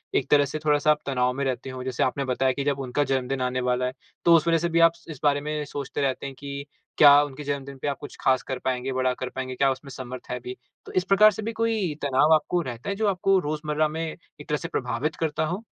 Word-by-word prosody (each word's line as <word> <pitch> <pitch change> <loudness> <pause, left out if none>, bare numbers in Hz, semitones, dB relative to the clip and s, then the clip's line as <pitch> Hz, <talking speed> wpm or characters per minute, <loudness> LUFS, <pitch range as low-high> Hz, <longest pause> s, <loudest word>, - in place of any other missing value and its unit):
एक 130 - +1
तरह 145 -1 +6
से 145 +3 -5
थोड़ा-सा 150 0 +4
आप 150 - +1
तनाव 125 -2 +1
में 140 +2 -3
रहते 130 0 -3
हो? 130 -1 -6
जैसे 130 -1 -1
आपने 135 +2 -1
बताया 130 0 +1
कि 140 - -3
जब 140 -1 0
उनका 135 +2 0
जन्मदिन 135 -1 -1
आने 125 0 -1
वाला 125 0 0
है, 125 - -2 0.3
तो 170 -1 +7
उस 165 0 +3
वज़ह 165 0 +4
से 170 +1 -1
भी 170 0 +2
आप 165 0 +7
स 170 - -21
इस 150 - -9
बारे 145 -1 +3
में 150 0 -3
सोचते 140 0 -5
रहते 135 -1 -1
हैं 135 -1 -6
कि 140 0 -6 0.3
क्या 145 -1 +8
उनके 145 0 -7
जन्मदिन 140 -1 -4
पे - - -2
आप 140 -2 -1
कुछ 145 - -9
खास 130 -1 +2
कर 130 -1 -4
पाएँगे, 130 +1 -2
बड़ा 130 0 +1
कर 125 0 -5
पाएँगे, 130 0 -5
क्या 135 +1 +3
उसमें 135 +1 -7
समर्थ 130 -1 -8
है 125 - -2
भी? 125 +1 -7 0.3
तो - - -9
इस 185 - +1
प्रकार 200 +3 +6
से 220 - -6
भी 220 +2 -3
कोई 220 -8 +1
तनाव 140 +3 +4
आपको 175 +3 0
रहता 125 0 -6
है 200 - -1
जो 215 +1 0
आपको 195 0 +2
रोज़मर्रा 155 -1 -1
में 160 +2 -4 0.4
एक - - -13
तरह 150 - +1
से - - -5
प्रभावित 125 +5 -2
करता 155 -1 -1
हो? 180 +7 -4
140 Hz, 265 wpm, -25 LUFS, 130-155 Hz, 0.4 s, क्या